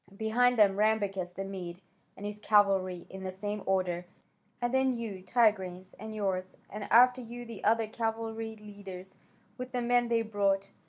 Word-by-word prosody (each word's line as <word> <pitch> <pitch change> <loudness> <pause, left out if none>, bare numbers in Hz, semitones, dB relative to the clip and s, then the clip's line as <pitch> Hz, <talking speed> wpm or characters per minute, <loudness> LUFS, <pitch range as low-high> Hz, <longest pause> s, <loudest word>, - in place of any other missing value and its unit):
Behind 245 +3 +3
them 200 -3 +5
Rambacas 200 -4 +1
the 195 - -4
Mede 180 -3 -6 0.4
and 205 - -7
his 210 0 -4
cavalry, 195 -4 +3
in 190 0 -8
the 190 - -3
same 205 +2 -4
order, 180 -2 0 0.5
and 240 0 -1
then 265 -1 +2
you, 215 -5 -5
Tigranes, 190 -3 +1
and 220 +1 -7
yours, 185 -3 -2
and 210 0 -5
after 250 +3 +6
you 240 +1 -8
the 230 -4 -9
other 225 +1 +3
cavalry 225 0 -3
leaders 200 -3 -10 0.4
with 255 0 -6
the 250 - 0
men 245 0 +3
they 230 -1 +2
brought. 200 -2 0
210 Hz, 165 wpm, -30 LUFS, 190-230 Hz, 0.5 s, after